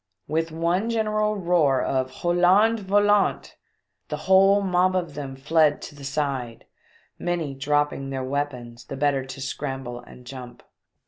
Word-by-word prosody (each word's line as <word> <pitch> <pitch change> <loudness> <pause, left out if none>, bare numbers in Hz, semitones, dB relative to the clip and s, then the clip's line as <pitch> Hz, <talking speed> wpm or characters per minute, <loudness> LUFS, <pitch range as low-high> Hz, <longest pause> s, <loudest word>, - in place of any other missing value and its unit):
With 160 +2 -1
one 170 +7 0
general 215 -2 0
roar 170 -8 +2
of 130 -1 0
r - - -19
Hollandais 180 +8 +3
Volant 205 +1 +2
I - - -35 0.5
the - - -4
whole 195 +1 +5
mob 185 0 +2
of 175 -5 -2
them 140 -2 -6
fled 150 +2 +2
to - - -8
the 145 -1 -13
side, 135 -4 -3 0.5
many 170 -5 -2
dropping 145 0 -1
their 135 -1 -3
weapons 125 -4 -4
the 135 - -7
better 140 -1 +1
to 135 - -9
scramble 135 -2 -5
and 125 0 -15
jump. 125 -1 -10
150 Hz, 150 wpm, -24 LUFS, 135-185 Hz, 0.5 s, whole